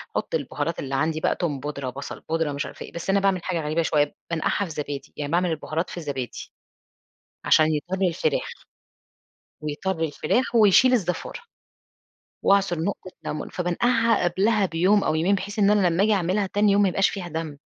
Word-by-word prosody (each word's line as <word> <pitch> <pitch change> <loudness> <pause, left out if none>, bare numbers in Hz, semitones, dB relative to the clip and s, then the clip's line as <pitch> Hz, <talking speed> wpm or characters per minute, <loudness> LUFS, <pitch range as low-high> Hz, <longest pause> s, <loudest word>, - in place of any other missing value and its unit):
باحُط - - -2
البهارات 165 - -3
اللي 135 0 -3
عندي 155 +3 0
بقى - - +1
توم 150 -6 -2
بودرة، 140 -2 -4
بصل 140 +3 -7
بودرة، 165 -2 0
مش 140 +2 -3
عارف - - -10
ايه، - - -7
بس 170 +2 -6
أنا 195 +1 +4
باعمل 195 -3 +1
حاجة 170 -2 -1
غريبة 155 +2 0
شوية، 150 -2 +1 0.2
بانقعها 165 +4 0
في 170 - -8
زبادي، 145 -2 -5
يعني 145 -1 -4
باعمل 175 +1 +2
البهارات 160 +2 -3
في 175 - -6
زبادي، 135 -6 -5 0.9
عشان 155 - +5
يطرّي 185 +5 -1
الفراخ، 160 -3 -1 1.1
بيطرّي 160 +3 -2
الفراخ، 240 - -1
ويشيل 230 +4 +6
الزفارة، 195 - -1 1.0
واعصُر 195 -4 +3
نقطة 185 +1 -3
لمون، 150 - -4
فبانقعها 230 +6 +1
قبلها 200 +4 +2
بيوم 185 +4 +2
أو 155 - +1
يومين، 175 +6 +2
بحيث 205 +2 -5
إن 200 -1 +5
أنا 205 -3 +4
لما 175 +3 +2
أجي 215 +1 +3
أعملها 195 +1 +1
تاني 205 +1 +2
يوم 200 +1 +4
ما 200 - +4
يبقاش 195 +2 +2
فيها 190 -4 -5
دم، 160 -3 -5
175 Hz, 180 wpm, -24 LUFS, 155-200 Hz, 1.1 s, ويشيل